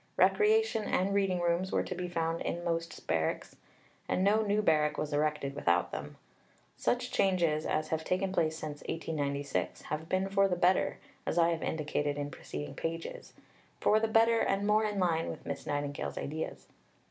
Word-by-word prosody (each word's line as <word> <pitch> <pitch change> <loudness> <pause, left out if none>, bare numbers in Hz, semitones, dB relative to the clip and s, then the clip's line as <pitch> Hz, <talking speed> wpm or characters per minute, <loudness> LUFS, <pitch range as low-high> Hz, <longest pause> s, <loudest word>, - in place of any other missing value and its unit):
Recreation 430 - +3
and 195 +2 +1
reading 195 -3 +1
rooms 175 +2 +1
were - - +2
to - - -4
be 180 0 -4
found 165 -1 -1
in 175 - -3
most 165 -1 -3
barracks, 80 -1 -1 0.5
and 185 - +1
no 210 +3 +4
new 210 0 +1
barrack 150 -4 +3
was 150 -1 -2
erected 150 -2 0
without 90 -9 +1
them. - - -6 0.6
Such - - 0
changes 170 -5 +2
as 155 0 0
have 160 0 -1
taken 185 +3 0
place 160 -4 +1
since 150 -2 -6
1896 145 -4 -2
have 155 +2 -4
been 190 +1 +1
for 195 0 +3
the 180 - 0
better, 180 +1 +2 0.3
as - - -1
I 170 0 +5
have 165 -1 -1
indicated 145 -2 -1
in 145 0 -3
preceding 75 - -6
pages; 165 0 -5 0.5
for 215 - +4
the 225 - +1
better, 225 +1 +4
and 195 +1 +1
more 215 +1 +3
in 210 -1 -2
line 165 -3 +1
with - - -7
Miss - - -5
Nightingale's 145 -1 -3
ideas. 155 +2 -4
165 Hz, 175 wpm, -31 LUFS, 150-195 Hz, 0.6 s, I